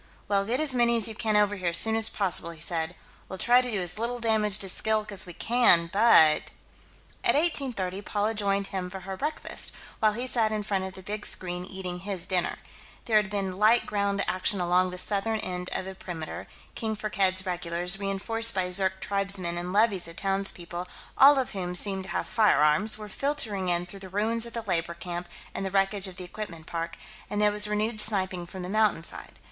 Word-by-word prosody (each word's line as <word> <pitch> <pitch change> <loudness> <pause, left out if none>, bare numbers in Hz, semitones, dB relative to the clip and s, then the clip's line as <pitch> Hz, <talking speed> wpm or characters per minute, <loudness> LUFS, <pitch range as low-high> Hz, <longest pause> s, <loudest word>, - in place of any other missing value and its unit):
"Well, 200 -1 +1
get 240 +5 -1
as 305 -4 +1
many 235 -1 +3
as 225 - +5
you 225 - -4
can 215 -1 0
over 205 0 +3
here, 180 -2 -1
as 170 - +3
soon 225 0 +5
as 225 0 +4
possible," 185 -4 -1
he 165 -2 -10
said. 165 +1 -1 0.3
"We'll 190 - -6
try 245 +5 +5
to 250 - -4
do 210 -4 -1
as 180 +2 -3
little 240 +2 -2
damage 220 -3 +2
to 195 - -1
Skilk 215 +2 0
as 190 -2 0
we 175 - -9
can, 180 -7 +4
but 195 -8 +5 0.3
..." - - -29
At - - +3
1830, 255 - 0
Paula 210 +2 -1
joined 200 -2 0
him 185 -1 -3
for 190 +1 -8
her 190 +1 -6
breakfast, 300 +9 -3 0.3
while 215 -2 +3
he 240 +4 -3
sat 230 -4 +1
in 215 -1 -2
front 195 -2 -1
of 190 - -7
the 190 - -12
big 210 +2 -5
screen, 180 -1 -3
eating 185 -2 -6
his 190 -2 -5
dinner. 185 -2 -1 0.5
There 220 -2 +3
had 210 -2 +1
been 195 -2 -3
light 220 +3 +4
ground 200 -1 -1
action 185 +2 -1
along 180 +1 +2
the 180 - -7
southern 210 +3 0
end 180 0 -4
of - - -2
the 190 - -6
perimeter 170 -4 -7 0.3
King 220 -1 -3
Firkked's 190 -2 0
regulars, 180 +1 -1
reenforced 215 +3 0
by 180 -1 -1
Zirk 190 0 +2
tribesmen 195 -3 -1
and 175 +1 -4
levies 200 -3 +2
of 165 - -10
townspeople, 185 -2 -3 0.3
all 280 +1 +7
of 260 -2 -1
whom 180 -2 -4
seemed 190 0 +1
to - - -10
have - - -2
firearms, 210 -1 +3
were 215 -1 -8
filtering 215 -6 0
in 175 0 0
through 195 +2 -10
the 190 -1 -10
ruins 225 +4 0
of 235 - -11
the 230 - -4
labor 170 -4 -2
camp 175 0 -6 0.2
and - - -4
the 190 - -2
wreckage 195 +1 +1
of 185 - -9
the 185 - -7
equipment 175 -3 -8
park 165 0 -5 0.3
and 205 - -2
there 210 0 +4
was 210 0 +1
renewed 215 +1 0
sniping 185 -5 +2
from 185 +1 -8
the - - -5
mountainside. 210 -4 -1
195 Hz, 215 wpm, -27 LUFS, 180-215 Hz, 0.5 s, all